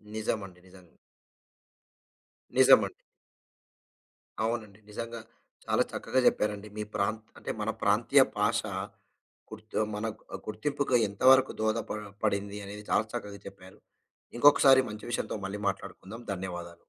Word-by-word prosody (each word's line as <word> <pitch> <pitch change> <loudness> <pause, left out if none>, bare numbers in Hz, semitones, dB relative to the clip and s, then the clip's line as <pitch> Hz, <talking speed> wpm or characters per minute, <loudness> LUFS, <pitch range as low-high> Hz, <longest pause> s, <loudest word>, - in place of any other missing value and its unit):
నిజమండి. 100 -4 -3
నిజంగా. 90 -1 -16 1.7
నిజమండి. - - +6 1.5
అవునండి. 110 -3 -3
నిజంగా 115 +2 -6 0.5
చాలా - - +2
చక్కగా 130 - -1
చెప్పారండి. 105 0 0
మీ 105 - -2
ప్రాంత్ 110 +2 -1
అంటే - - -5
మన - - -1
ప్రాంతీయ - - +4 0.2
భాష - - +2 0.9
గుర్తు 110 0 -10
ఆహ్, 105 - -2
మన 105 +2 -2 0.3
ఆహ్, - - -5
గుర్తింపుకు 130 +4 0
ఎంతవరకు 130 +6 +5
దోహద 110 0 +1
పడ 110 - -2 0.3
పడింది 100 0 -1
అనేది 105 +1 -8
చాలా 110 - +3
చక్కగా 105 -4 -5
చెప్పారు. 95 -1 -12 0.6
ఇంకొకసారి 135 -1 +7
మంచి 105 0 -8
విషయంతో 120 - -2
మళ్ళీ 100 +1 -5
మాట్లాడుకుందాం. 100 +3 -6
ధన్యవాదాలు. 90 -2 -6
105 Hz, 115 wpm, -29 LUFS, 100-115 Hz, 1.7 s, ఇంకొకసారి